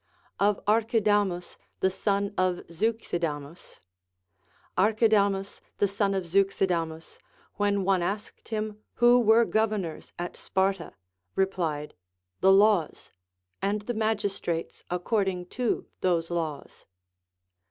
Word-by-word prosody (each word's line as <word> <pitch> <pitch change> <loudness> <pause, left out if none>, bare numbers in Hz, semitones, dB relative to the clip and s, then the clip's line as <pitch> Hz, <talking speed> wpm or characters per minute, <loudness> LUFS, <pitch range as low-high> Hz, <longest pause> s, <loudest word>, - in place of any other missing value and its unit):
Of 205 0 +3
Arckidamus 210 -4 +1 0.2
the 190 - +2
Son 200 +1 -1
of 185 -1 0
Zeiixidamns. 170 -6 -3 0.9
Archidamus 200 -1 +2 0.2
the 205 - +3
son 200 0 0
of 190 - -1
Zeuxidamus, 170 -3 0 0.4
when 205 -1 +1
one 190 -1 +2
asked 205 +4 -4
him 215 -1 -3 0.2
who 240 +1 +6
were 230 0 +5
governors 215 -8 -1
at 175 0 -5
Sparta, 190 -2 -1 0.4
replied, 170 -6 -1 0.5
The 190 - +5
laws, 195 -4 +3 0.5
and 200 +2 0
the 240 - -3
magistrates 205 -6 -2
according 180 0 -1
to 245 -2 -1
those 170 -2 0
laws. 160 -4 -4
195 Hz, 100 wpm, -27 LUFS, 175-210 Hz, 0.9 s, who